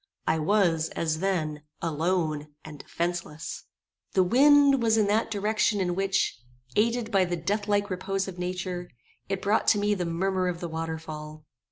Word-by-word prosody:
I 160 +1 +1
was, 165 -2 +2
as 160 -1 -1
then, 160 -6 -1 0.2
alone, 160 -2 -1 0.2
and 150 -2 -9
defenceless. 170 -2 -4 0.5
The 190 - +4
wind 280 +5 +5
was 225 -1 +3
in 215 - +4
that 220 +2 +2
direction 210 0 +1
in 180 -2 0
which, 195 - 0 0.4
aided 230 +1 +1
by 195 -3 +4
the 175 -1 -2
deathlike 205 +3 0
repose 190 +1 -2
of 180 -2 -7
nature, 180 0 -4 0.4
it 195 -1 -2
brought 205 +2 +2
to 210 - +5
me 205 0 +2
the 180 -4 -2
murmur 185 +2 0
of 175 -2 -2
the 175 - -4
water 160 0 -3
fall. 155 -1 -9
185 Hz, 165 wpm, -27 LUFS, 165-205 Hz, 0.5 s, wind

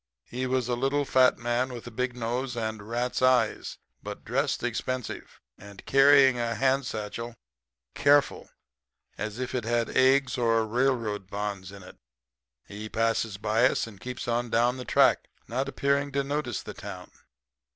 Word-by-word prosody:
He 130 +1 -4
was 130 -2 0
a 125 - 0
little, 135 +3 0
fat 130 -1 +4
man 120 +2 -1
with 120 -2 -8
a 120 - -8
big 125 +2 -2
nose 120 +2 -3
and 110 -2 -4
rat's 120 +2 -2
eyes, 130 -1 +2 0.2
but 105 0 -8
dressed 135 +4 -1
expensive, 120 +1 -4 0.2
and 100 0 -13
carrying 135 -2 +6
a 115 0 -1
hand 135 +2 +1
satchel 110 +2 -5 0.6
careful, 145 0 +2 0.7
as 105 +1 -4
if 130 0 -4
it 125 -3 -1
had 115 +1 0
eggs 130 0 +3
or 115 -1 +2
railroads 115 -4 -1
bonds 100 -2 -4
in 100 -2 -11
it. 90 - -14 0.7
He 105 +2 -8
passes 115 -2 0
by 110 +4 +3
us - - -1
and 105 -4 -13
keeps 125 -1 -6
on 120 0 -1
down 120 +3 +2
the 125 - -7
track, - - +3 0.2
not 130 +4 -2
appearing 140 +1 0
to 140 0 +1
notice 140 -3 -3
the - - -8
town. 95 -3 -9
120 Hz, 160 wpm, -27 LUFS, 110-130 Hz, 0.7 s, carrying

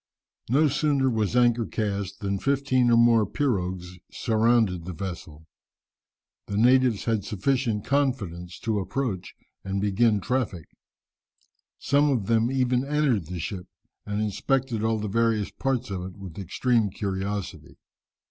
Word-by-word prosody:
No 145 +6 +4
sooner 140 -2 +1
was 110 -1 0
anchor 120 -2 +3
cast 100 -2 -3
than 100 -1 -1
fifteen 135 -2 +2
or 115 - +5
more 115 -1 +5
pirogues 90 -7 -2
surrounded 110 -6 +1
the 90 - -5
vessel. 80 -4 -7 1.0
The 100 - -3
natives 125 -1 +4
had 110 -4 0
sufficient 110 +1 -1
confidence 110 -11 -1
to 110 -2 0
approach 100 -3 -3 0.3
and 95 0 -2
begin 105 +2 +2
traffic. 105 -8 -2 1.1
Some 145 +1 +2
of 120 -8 0
them 115 +2 +2
even 125 -1 +1
entered 140 - +1
the 90 +1 -5
ship, 90 +2 -5 0.4
and 105 0 -3
inspected 115 +3 -1
all 110 0 +1
the 105 0 -3
various 110 0 +1
parts 130 -4 -2
of 95 -2 -3
it 90 +1 -8
with 95 -2 -9
extreme 115 +3 +1
curiosity. 100 0 -4
110 Hz, 135 wpm, -26 LUFS, 95-125 Hz, 1.1 s, or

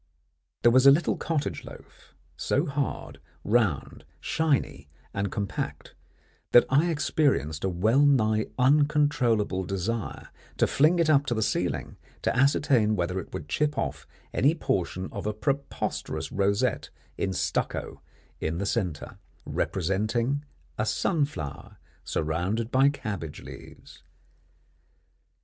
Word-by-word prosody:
There 120 - +7
was 130 +2 +6
a - - +11
little 155 +5 +2
cottage 145 - -2
loaf, - - -14 0.2
so - - 0
hard, 140 -1 -3 0.2
round, 105 - 0 0.2
shiny, 155 - -1 0.2
and 100 -1 -2
compact, 100 -2 -4 0.6
that 120 - +8
I 150 +6 +4
experienced 145 - 0
a 95 - +1
well 110 +10 +3
nigh 110 -6 +3
uncontrollable 130 -8 +2
desire 100 +4 -3 0.3
to - - +4
fling 155 +5 +3
it 170 -2 +2
up 145 -2 +4
to 120 - 0
the 110 - +1
ceiling - - -2 0.3
to - - +1
ascertain 130 -5 +3
whether 90 0 -1
it 95 - -9
would 75 - -6
chip 150 - 0
off 70 - -3 0.3
any 145 +5 +3
portion 95 - -2
of 105 -1 -5
a 105 - 0
preposterous 105 - -3
rosette 100 0 0 0.3
in 95 - -1
stucco 95 - -2 0.4
in 80 +1 -2
the 100 - -2
centre, 95 -8 -3 0.3
representing 110 - -1 0.4
a 110 - +1
sunflower 145 - -2 0.3
surrounded 90 +9 -1
by 135 +2 +5
cabbage 100 - -5
leaves. - - -12
115 Hz, 125 wpm, -27 LUFS, 95-140 Hz, 0.6 s, a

